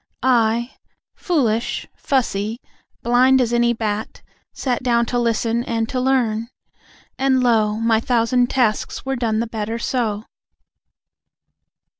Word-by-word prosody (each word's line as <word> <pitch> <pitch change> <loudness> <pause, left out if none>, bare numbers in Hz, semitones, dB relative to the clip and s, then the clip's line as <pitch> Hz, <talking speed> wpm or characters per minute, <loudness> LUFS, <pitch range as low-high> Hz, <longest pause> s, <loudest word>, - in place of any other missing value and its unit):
I, 235 -1 +2 0.4
foolish, 240 - -1
fussy, 230 -4 -1 0.4
blind 255 +2 +4
as 240 -2 +1
any 240 0 +3
bat, 220 -2 -4 0.3
Sat 250 -3 -2
down 235 -2 +2
to 245 +1 -1
listen, 230 0 0
and 225 -2 -2
to 255 - -2
learn. 235 -4 +1 0.7
And 265 -1 +2
lo, 220 -3 +2
My 225 0 +2
thousand 245 +1 +1
tasks 245 -3 0
were 270 0 -1
done 225 -3 0
the - - -1
better 225 0 -4
so. 230 -3 -2
235 Hz, 120 wpm, -20 LUFS, 225-250 Hz, 0.7 s, blind